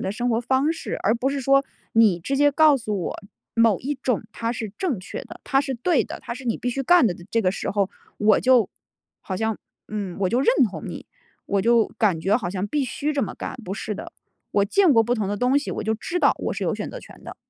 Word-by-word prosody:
的 190 - -2
生 240 +4 -1
活 225 0 +1
方 265 +6 +1
式， 325 - -5
而 220 - +3
不 245 +3 0
是 280 +1 -2
说 275 +1 +4 0.3
你 220 -6 +5
直 270 +11 -3
接 290 +1 +4
告 300 -1 +5
诉 215 -4 -3
我， - - -3 0.4
某 230 -4 +4
一 285 +4 -2
种 255 -4 -1
它 230 0 -2
是 220 -4 -5
正 315 - -1
确 185 - -7
的， - - -11
它 270 -1 +2
是 270 -2 -3
对 285 +6 +2
的， - - -7
它 - - -6
是 255 +1 -8
你 230 - +1
必 245 - -2
须 270 +3 -2
干 350 -1 +5
的。 185 - 0 0.2
这 230 - +1
个 185 - +3
时 - - -3
候 200 -1 0 0.3
我 210 0 +4
就 250 -5 +4 0.5
好 185 - -4
像， 220 0 -1 0.3
嗯， 200 -4 -4
我 195 - +2
就 245 - +2
认 275 - 0 0.2
同 - - -7
你， - - -7 0.4
我 200 -1 0
就 230 +1 +4
感 200 -7 +2
觉 195 +6 +1
好 190 -8 -4
像 185 +2 -3
必 285 +7 0
须 290 +5 -2
这 280 -3 0
么 205 - -4
干， - - -6
不 190 0 -5
是 215 0 -4
的。 - - -8 0.4
我 200 - +3
见 365 - +4
过 225 - +6
不 240 +2 0
同 215 -5 -2
的 205 - -1
东 255 +5 +3
西， 290 - -5
我 - - -3
就 220 - +1
知 335 +10 -3
道 - - +4
我 - - -2
是 - - -3
有 - - 0
选 - - -4
择 - - -7
权 - - -15
的。 - - -9
230 Hz, 280 characters per minute, -23 LUFS, 205-270 Hz, 0.5 s, 过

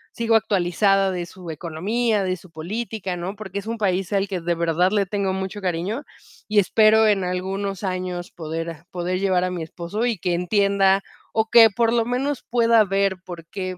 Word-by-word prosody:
sigo 230 -1 +2
actualizada 195 -1 +2
de 180 -2 -3
su 175 0 -11
economía, 195 +8 -1
de 185 -1 -1
su 180 0 -17
política, 195 +3 -4
¿no? 180 +4 -5
Porque 200 -2 -7
es 200 - -4
un 230 0 -4
país 190 -1 0
al 200 0 +1
que 190 -3 -4
de 170 +1 0
verdad 170 +2 +1
le 205 -2 +1
tengo 195 -1 -1
mucho 190 +2 -4
cariño, 190 - -2 0.4
y 210 0 +3
espero 220 +3 +5
en 200 -3 +2
algunos 190 +2 -3
años 185 -1 -3
poder, 165 0 -5
ah, 165 0 -10
poder 180 +1 -2
llevar 190 -2 +2
a 185 - 0
mi 180 -2 -4
esposo 170 +7 -4
y 235 -6 -1
que 175 +1 0
entienda 195 +1 +2 0.3
o 220 0 +1
que, 225 -2 +8
por 230 +2 +1
lo 230 -1 +2
menos, 255 +3 -2
pueda 230 -2 +4
ver 195 0 +1
por 170 -2 -9
qué 185 0 -5
190 Hz, 195 wpm, -23 LUFS, 180-215 Hz, 0.4 s, que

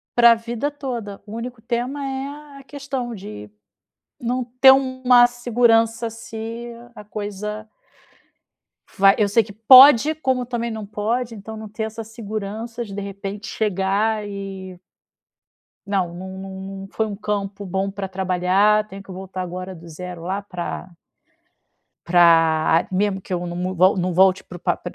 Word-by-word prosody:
pra 235 -1 +8
vida 235 +5 -3
toda, 240 -8 -6
o 210 - -10
único 235 +1 -6
tema 245 +5 -3
é 280 +2 -6
a - - -14
questão 270 -3 -5
de 105 - -9 0.7
não 245 +1 -1
ter 255 +2 +6
uma 260 -2 +4
segurança 235 -1 +2
se 230 +1 -7 0.2
a 210 - -11
coisa 210 +1 -6 1.3
vai 195 0 +6
eu 210 - +4
sei 220 +3 +3
que 210 - -12
pode, 260 +6 +8
como 260 -5 -1
também 235 -1 -3
não 220 -1 -5
pode, 225 +3 -2
então 220 +2 -8
não 215 0 -8
ter 215 +2 -5
essa 220 +1 -5
segurança 220 +1 -6
de 200 - -10
de 205 - -4
repente 200 +1 -6
chegar 210 +1 0
e 195 -2 -7 1.1
não, 190 -4 -1
não 190 +2 -8
não 195 0 -8 0.3
não 195 - -8
foi 220 - 0
um 210 -2 -5
campo 200 -1 -4
bom 190 +1 -1
para 195 0 -5
trabalhar 190 +3 +2
tenho 195 -1 -9
que 195 - -12
voltar 185 0 -6
agora 185 +1 -6
do 170 0 -13
0 175 +1 -8
lá 190 +3 -2
para 180 -2 -6 1.2
pra 165 -2 +4
mesmo 195 +1 0
que 185 - -6
eu 175 0 -2
não 175 0 -5
não 185 +1 -2
volte 185 +1 +4
não 180 0 -1
volte 190 +1 +4
o - - -34
pra - - -1
210 Hz, 155 wpm, -22 LUFS, 190-235 Hz, 1.3 s, pra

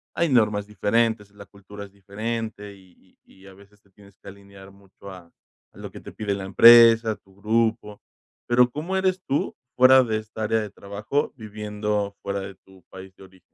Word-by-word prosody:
hay 170 -2 0
normas 105 -5 +1
diferentes. 105 0 -1
La 100 0 -14
cultura 100 +1 -13
es 100 - -18
diferente, 105 +1 -6
y 95 -2 -24
y 95 +1 -21
a 95 - -14
veces 100 +1 -21
te 100 - -31
tienes 100 0 -21
que - - -19
alinear 100 0 -15
mucho, 100 0 -15
a 90 -2 -14 0.4
a - - -20
lo - - -9
que - - -11
te - - -12
pide 105 -2 -3
la 95 -1 -6
empresa, 115 +1 +6
tu 95 -1 -26
grupo. 110 0 -2 0.5
Pero, 120 +1 +3
¿cómo 155 +8 -5
eres 190 -1 0
tú, 140 - -2 0.2
fuera 130 +1 +6
de 110 -2 -2
esta 110 0 -7
área 110 +1 0
de 105 - -6
trabajo, 105 +8 -4
viviendo 105 -2 -4
fuera 100 0 -4
de 95 0 -9
tu 95 0 -22
país 95 0 -12
de - - -15
origen? 95 -1 -19
105 Hz, 190 wpm, -23 LUFS, 100-115 Hz, 0.5 s, empresa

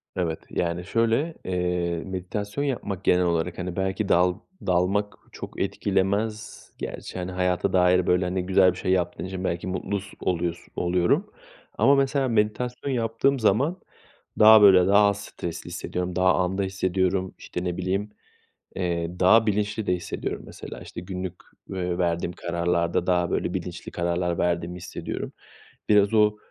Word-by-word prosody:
Evet, 85 -3 -1
yani 85 0 -2
şöyle, 115 - +1
eee, 90 -2 -1
meditasyon 100 +6 -4
yapmak 105 -9 -3
genel 90 -1 +3
olarak, 85 0 -1
hani, 90 -1 -4
belki 95 +2 -1
dal 90 +1 +4 0.3
dalmak 95 +3 +1 0.2
çok - - -7
etkilemez 100 +2 -1
gerçi. - - -6
Hani 90 +1 -4
hayata 90 -1 0
dair 90 0 +4
böyle, 90 +1 +3
hani, 90 0 -2
güzel 95 0 +5
bir 90 - -9
şey 95 - -1
yaptığın 90 -1 0
için 95 0 -5
belki 85 0 -2
mutlus 100 +2 -3
oluyos 85 -1 -1 0.2
oluyorum 90 - +1 0.5
ama 140 - +5
mesela 135 0 +1
meditasyon 120 +4 -1
yaptığım 120 +3 +1
zaman 135 - +2 0.6
daha 110 0 +9
böyle, 95 -3 +7
daha 100 +1 +6
az 100 0 -1
stresli 85 -1 -6
hissediyorum, 90 0 -4
daha 90 0 +4
anda 95 +2 0
hissediyorum; 95 0 0
işte, 90 - -5
ne 90 -1 -2
bileyim, 95 +3 -2 0.7
eee, 85 -1 -2
daha 110 +5 +6
bilinçli 105 0 -1
de 90 - +2
hissediyorum. 85 -2 -4
Mesela, - - -9
işte, - - -8
günlük, 90 0 -5 0.4
eee, 90 -2 -2
verdiğim 85 -1 0
kararlarda 85 0 -1
daha 90 -1 +2
böyle - - -1
bilinçli - - -5
kararlar 85 0 -1
verdiğimi 85 0 -1
hissediyorum. 90 0 -6 0.6
Biraz 105 0 +4
o, 105 -1 +4
95 Hz, 145 wpm, -25 LUFS, 90-105 Hz, 0.7 s, daha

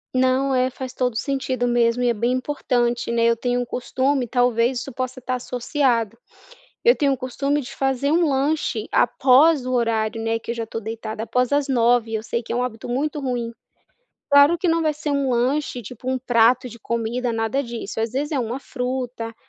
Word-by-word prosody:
Não, 260 +1 +2
é 255 0 +2
faz 260 0 -7
todo 250 -3 -1
sentido 260 0 -1
mesmo, 240 0 +2
e 245 - +3
é - - +2
bem 235 +3 0
importante, 245 -3 -1
né, 230 0 +1
eu 235 0 +4
tenho 245 +1 -1
um - - -3
costume 260 +2 -1
talvez 245 +1 +2
isso 270 +2 -7
possa 255 +1 -4
estar 255 0 -2
associado 245 -2 0 0.7
eu 480 +1 +5
tenho 280 -2 +2
um - - 0
costume 275 +3 -1
de 270 +1 -9
fazer 270 +1 0
um 335 +1 +3
lanche 290 +2 0
após 270 +2 +4
o 255 - -2
horário, 225 -1 0
né, 225 0 0
que 230 - -8
eu - - -1
já 230 -1 -3
estou 225 0 -6
deitada 220 0 -5
após 250 +3 0
as 285 0 +1
21h 240 -3 +2
eu 220 - -1
sei 235 +1 -3
que 230 - -5
é - - -1
hábito 245 -3 -4
muito 290 +4 -1
ruim. 245 -3 -2 0.8
Claro 285 +4 +6
que 350 - 0
não 330 0 +2
vai 310 -1 +1
ser 300 0 -5
um 280 -2 0
lanche 250 +1 0
tipo 250 +4 -7
um 260 - 0
prato 245 0 +3
de 235 - -12
comida 235 +2 -2
nada 225 +5 0
disso 235 -3 -6
às 225 +1 -2
vezes 290 +4 -2
é 285 - 0
uma 240 +1 -2
fruta, 250 -3 -4
250 Hz, 205 wpm, -22 LUFS, 235-270 Hz, 0.8 s, Claro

